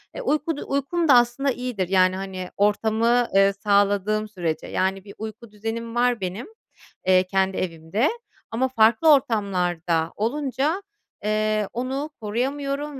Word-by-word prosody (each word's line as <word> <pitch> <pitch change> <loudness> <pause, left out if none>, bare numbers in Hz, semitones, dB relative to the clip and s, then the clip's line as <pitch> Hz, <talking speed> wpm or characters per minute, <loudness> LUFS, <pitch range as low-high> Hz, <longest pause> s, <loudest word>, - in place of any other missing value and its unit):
Eee, - - -5
uykudu 305 - -1
uykum 295 +5 0
da 275 - +7
aslında 245 +3 +3
iyidir. 245 -7 -3
Yani, 185 -1 +4
hani, 190 -1 -5
ortamı, 225 +4 +2
eee, 195 0 +5
sağladığım 205 +1 +1
sürece. 175 -6 -3
Yani, 190 0 -1
bir 200 - -11
uyku 220 +1 -8
düzenim 225 +2 -5
var 240 -3 +2
benim, 185 +5 -4 0.6
eee, 185 0 +5
kendi 190 0 0
evimde 175 - -1 0.4
ama 250 +4 +1
farklı 240 +6 +5
ortamlarda 180 - 0
olunca, 280 - -1 0.4
eee, 215 -1 0
onu 265 +5 -3
koruyamıyorum 275 +6 -3
220 Hz, 130 wpm, -24 LUFS, 195-260 Hz, 0.6 s, da